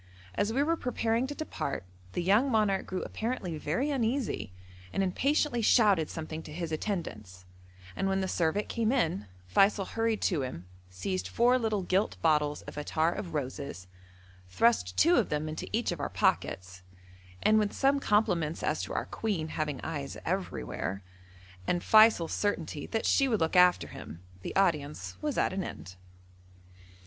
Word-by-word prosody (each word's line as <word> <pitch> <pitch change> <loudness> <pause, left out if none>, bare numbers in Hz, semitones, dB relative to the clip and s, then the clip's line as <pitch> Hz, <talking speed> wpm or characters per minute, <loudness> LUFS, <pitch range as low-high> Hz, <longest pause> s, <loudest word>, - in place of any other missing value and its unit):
As 205 - 0
we 270 +5 +2
were 330 +3 +2
preparing 235 -3 0
to 290 - -6
depart 285 - -4 0.3
the 175 - -1
young 210 +9 +4
monarch 210 -5 +1
grew 185 - -3
apparently 220 -7 -3
very 250 - -1
uneasy, 245 - -1 0.4
and 195 - 0
impatiently 270 +6 +1
shouted 205 -8 +4
something 160 -1 -5
to 150 - -11
his 165 +1 -4
attendants, 110 - -4 0.5
and 195 - -1
when 195 0 +1
the 190 - -1
servant 175 +4 0
came 230 -1 0
in, 160 - 0 0.2
Feysul 195 - +3
hurried 225 -1 0
to 170 -7 +1
him, 125 -10 -5 0.2
seized 185 - -3
four 245 +2 +3
little 215 -4 0
gilt 190 +4 0
bottles 150 -2 +2
of - - -10
attar 160 +2 +1
of 170 -5 -6
roses, 135 -8 -4 0.6
thrust 95 -2 +2
two 170 - +5
of - - +2
them 150 +1 -1
into 155 0 -5
each 230 -1 0
of 175 - -4
our 145 - -2
pockets, 90 0 -1 0.6
and 215 0 +5
with 210 -1 +1
some 280 +1 +2
compliments 175 - +1
as - - 0
to - - -5
our - - -1
Queen 185 -8 -2
having 150 -3 -2
eyes 145 -4 -4
everywhere, 100 - -3 0.6
and 175 0 0
Feysul's 215 -7 +6
certainty 165 -7 -2
that 225 - -2
she 275 - +4
would 225 -4 +1
look 160 +2 0
after 180 0 +5
him, 85 - -10 0.2
the - - -6
audience 150 -6 0
was 300 -3 -2
at - - +1
an 190 0 -2
end. 90 - -8
180 Hz, 165 wpm, -30 LUFS, 150-220 Hz, 0.6 s, Feysul's